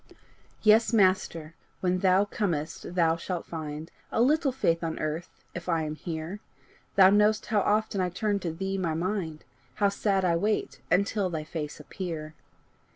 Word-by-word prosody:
Yes, 220 +2 +5
Master, 185 -6 +2 0.3
when 185 0 +1
thou 190 +1 +4
comest 170 -4 -3
thou 165 -2 +3
shalt 175 0 -4
find 155 0 -6 0.2
A - - 0
little 280 +3 +3
faith 170 -10 0
on 160 -1 -2
earth, 155 +3 -3 0.2
if 175 +1 -6
I 165 -2 +1
am 155 0 -3
here! 165 +4 -5 0.6
Thou 190 -1 +8
know'st 210 +1 +3
how 215 - +1
oft 215 +2 +1
I 185 -2 +1
turn 205 +3 -1
to 175 -3 -3
thee 190 +4 -3
my 165 -4 -1
mind, 170 -3 -2 0.3
How 200 -1 +3
sad 200 -1 +1
I 170 -2 +3
wait 210 +5 -1
until 200 +2 +2
thy 160 -3 -3
face 155 -1 -5
appear! 155 -1 -6
180 Hz, 160 wpm, -28 LUFS, 160-205 Hz, 0.6 s, Thou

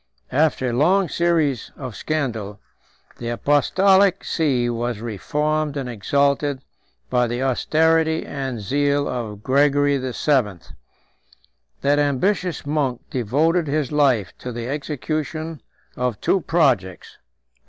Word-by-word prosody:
After 140 -1 +2
a 120 - -1
long 180 +8 +3
series 160 -8 +1
of 130 -6 -7
scandal, 110 -9 -3 0.6
the 115 - -4
apostolic 190 +10 +3
see 135 -7 0
was 120 -1 -2
reformed 150 - -2
and 135 -2 -3
exalted 140 +4 0 0.5
by 125 -1 +2
the 120 +2 -2
austerity 160 +4 +2
and 135 -4 -4
zeal 145 +6 +1
of 110 -4 -5
Gregory 140 +1 +3
VII. 130 - 0 1.2
That 145 +1 +2
ambitious 165 +6 0
monk 145 -4 -1
devoted 155 - +1
his 145 -2 -1
life 130 - +2
to 125 - -6
the 120 0 -5
execution 155 +3 -4 0.3
of 125 -5 -2
two 190 - +1
projects. 130 - 0
140 Hz, 110 wpm, -22 LUFS, 120-155 Hz, 1.2 s, long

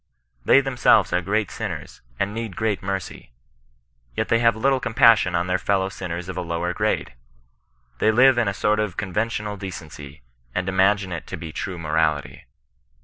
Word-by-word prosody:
They 135 - +6
themselves 130 -3 +3
are' 90 - +2
great 105 +3 -1
sinners, - - -6 0.2
and 100 +1 -1
need 115 -4 -5
great 110 -3 -1
mercy: 95 -9 -5 0.8
yet - - -2
they 115 - +3
have 115 -1 +3
little 135 +4 +2
compassion 115 -6 +4
on 85 +1 +1
their 90 0 0
f£ow 95 -1 0
sinners 90 -2 -5
of 95 - -6
a 90 - -2
lower 85 +1 -2
grade. - - -1 0.9
They - - +3
live 125 +2 +5
in 115 - +1
a 100 - 0
sort 105 +3 +1
of 105 -5 -2
conven 105 +3 -1
tional 105 -3 -4
decency, 75 -8 -9 0.3
and 95 0 -1
imagine 95 0 +2
it 85 -3 -6
to - - -6
be 80 0 -7
true 90 +3 -5
morality. 75 -4 -1
95 Hz, 175 wpm, -23 LUFS, 90-110 Hz, 0.9 s, They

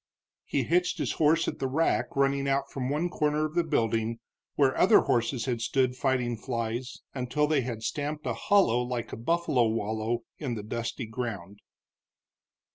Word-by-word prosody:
He - - 0
hitched 180 +3 +1
his - - -1
horse 160 +1 +3
at - - -3
the 135 - 0
rack 155 +6 0
running 140 0 +2
out 135 0 0
from 130 -2 -3
one 150 +5 0
corner 150 -2 0
of 155 - -5
the 175 0 +2
building, 115 -6 0 0.4
where 135 -2 +3
other 210 +3 +6
horses 120 0 0
had 120 -3 -1
stood 125 +2 +1
fighting 125 -3 0
flies 120 +1 -4
until 135 +3 0
they 150 -2 +2
had 115 -3 -5
stamped 150 +4 -3
a - - 0
hollow 195 - +3
like 125 -1 -4
a - - -2
buffalo 130 -2 +1
wallow 110 +1 -1 0.2
in 130 -6 -3
the 105 - -5
dusty 115 +3 -4
ground. 110 -5 -5
130 Hz, 170 wpm, -28 LUFS, 115-150 Hz, 0.4 s, other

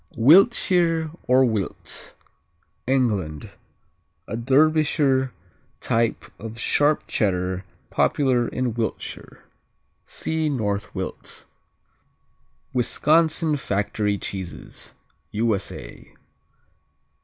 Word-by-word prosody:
Wiltshire 165 - +4 0.2
or 130 +1 +5
Wilts 110 -6 -3 0.7
England 105 - 0 0.8
A 110 - -4
Derbyshire 135 0 +3 0.5
type 115 0 0
of 115 +1 -7
sharp 145 +5 +2
Cheddar 95 -2 -1 0.3
popular 130 -4 +2
in 125 -2 -2
Wiltshire. 115 -1 -5 0.6
(See 160 -1 -2
North 105 -7 -2
Wilts.) - - -6 1.3
Wisconsin 155 +5 +2
Factory 105 -2 -1
Cheeses 95 -3 -6 0.4
_U.S.A. 110 -3 -3
125 Hz, 70 wpm, -23 LUFS, 105-150 Hz, 1.3 s, or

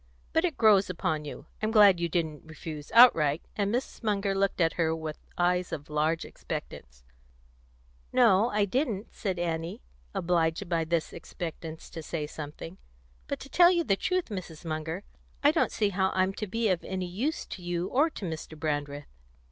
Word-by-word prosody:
But 325 - +3
it 335 -5 -2
grows 205 -4 +5
upon 160 -4 -2
you. 145 - -8 0.2
I'm 215 - +1
glad 205 -5 +6
you 170 0 0
didn't 160 -3 -2
refuse 155 -1 -8
outright;" 165 - +6
and 200 -1 0
Mrs. 245 +3 -3
Munger 200 -3 0
looked 195 0 0
at 165 -2 +3
her 160 -1 +1
with 160 -1 -6 0.2
eyes 180 0 +1
of 150 0 -6
large 155 +2 +1
expectance. - - -7 1.1
"No, 230 -3 +5
I 205 -2 +2
didn't," 225 -2 -2
said 190 -4 -3
Annie, 165 - -3 0.3
obliged 170 +1 +1
by 165 -2 0
this 165 0 -1
expectance 160 -1 -7
to 165 - -6
say 155 -1 -3
something. 155 +4 -8 0.5
"But - - -3
to 275 - -9
tell 350 +3 +7
you 345 -2 +2
the 200 -10 +2
truth, 365 - -1
Mrs. 180 -5 -7
Munger, 160 +3 -3 0.4
I 290 - +7
don't 320 - +1
see 210 -2 +1
how 190 0 +1
I'm 185 +1 +2
to 210 - -4
be 225 +4 0
of 180 -3 0
any 185 -1 -3
use 230 - -2
to 185 - -8
you 175 0 -2
or 290 +9 +3
to 215 - -7
Mr. 160 -1 -6
Brandreth." 145 -2 -2
180 Hz, 180 wpm, -28 LUFS, 160-210 Hz, 1.1 s, tell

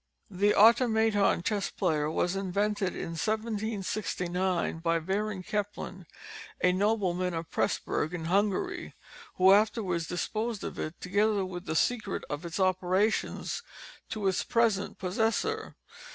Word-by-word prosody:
The 205 +2 +2
Automaton 220 -4 +4
Chess 205 -1 0
Player 155 -6 0
was 175 +3 0
invented 200 0 -1
in - - -4
1769, 195 -3 -2
by 165 0 +1
Baron 190 +3 -2
Kempelen, 205 -3 -4 0.5
a 180 - +4
nobleman 185 -3 +1
of 165 0 -5
Presburg, 155 - 0
in 170 -2 -5
Hungary, 195 +3 0 0.4
who 190 +1 +6
afterwards 200 -5 +1
disposed 215 +5 -2
of - - -5
it, 155 +2 -5
together 205 +1 +1
with 180 -1 -7
the 160 - -2
secret 220 +2 0
of 145 +3 -4
its 170 +3 -5
operations, 185 +3 +1 0.5
to 210 -3 -2
its 190 - +1
present 225 -4 +1
possessor. 225 - -1
195 Hz, 125 wpm, -29 LUFS, 180-215 Hz, 0.5 s, who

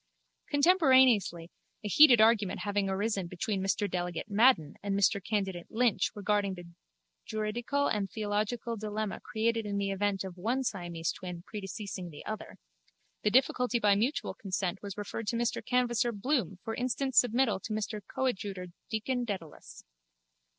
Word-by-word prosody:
Contemporaneously, 260 - +4 0.3
a - - -3
heated 250 +2 +7
argument 215 -3 +3
having 205 -1 0
arisen 195 -1 -1
between 190 +3 -2
Mr 195 +2 0
Delegate 175 +1 -4
Madden 205 - +4
and 200 -1 -1
Mr 200 -1 +2
Candidate 195 -5 -2
Lynch 230 -1 +2
regarding 205 -1 0
the 175 -1 -10 0.6
juridical 235 +6 -1
and 205 -5 0
theological 215 +2 -2
dilemma 215 -1 -3
created 225 +1 -1
in 200 -1 -2
the 200 0 -1
event 195 0 0
of 185 -2 -8
one 245 +8 0
Siamese 175 -7 -2
twin 180 -2 -8
predeceasing 195 -3 -6
the 150 -2 -11
other, 215 -1 -6 0.6
the 210 - +2
difficulty 250 +1 +2
by 210 -3 +4
mutual 230 +9 0
consent 190 -2 -3
was 200 -1 -7
referred 210 +1 -5
to 235 - 0
Mr 235 0 -1
Canvasser 240 -1 +1
Bloom 210 - -1
for 225 - -4
instant 255 +2 -1
submittal 245 -4 +3
to 220 - -7
Mr 215 0 -3
Coadjutor 200 -8 -3 0.2
Deacon 245 +3 -1
Dedalus. 190 -9 -7
210 Hz, 145 wpm, -30 LUFS, 195-235 Hz, 0.6 s, heated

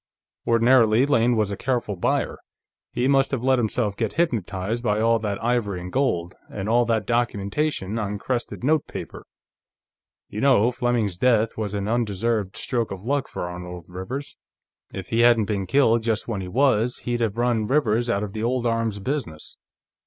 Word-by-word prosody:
Ordinarily, 115 0 +4
Lane 120 -4 +3
was 105 -2 0
a - - -2
careful 120 -3 -2
buyer; 85 - -1 0.5
he 120 +1 0
must 135 -1 +3
have 130 -4 -3
let 130 -1 +3
himself 110 -2 -1
get 110 -1 -2
hypnotized 115 - -1
by 105 -3 +1
all 115 +1 +3
that 105 -2 -2
ivory 115 -6 0
and 90 +1 -8
gold, 90 -10 0 0.2
and 100 0 -5
all 120 +2 +3
that 110 -2 0
documentation 115 0 -1
on 105 -1 -3
crested 120 +3 -3
notepaper. 155 +3 -2 1.0
You 105 - -6
know, 125 -4 +4
Fleming's 120 -7 -1
death 115 -3 +2
was 105 -2 -3
an 100 0 -2
undeserved 110 -2 -1
stroke 120 -3 -2
of 95 -1 -7
luck 140 +3 -1
for - - -5
Arnold 90 -1 -8
Rivers. 95 +11 -6 0.6
If 95 -2 -7
he 115 - 0
hadn't 120 -2 +5
been 100 -2 -2
killed 120 -1 +3
just 110 -2 -1
when 105 -5 -3
he 95 - -6
was, 125 +1 +2
he'd 120 -1 -2
have 115 -2 -1
run 120 -3 +1
Rivers 120 -4 +1
out 105 -3 0
of 100 -2 -5
the 110 - -4
old 120 +1 0
arms 115 -2 0
business." 100 - -5
115 Hz, 175 wpm, -24 LUFS, 100-120 Hz, 1.0 s, hadn't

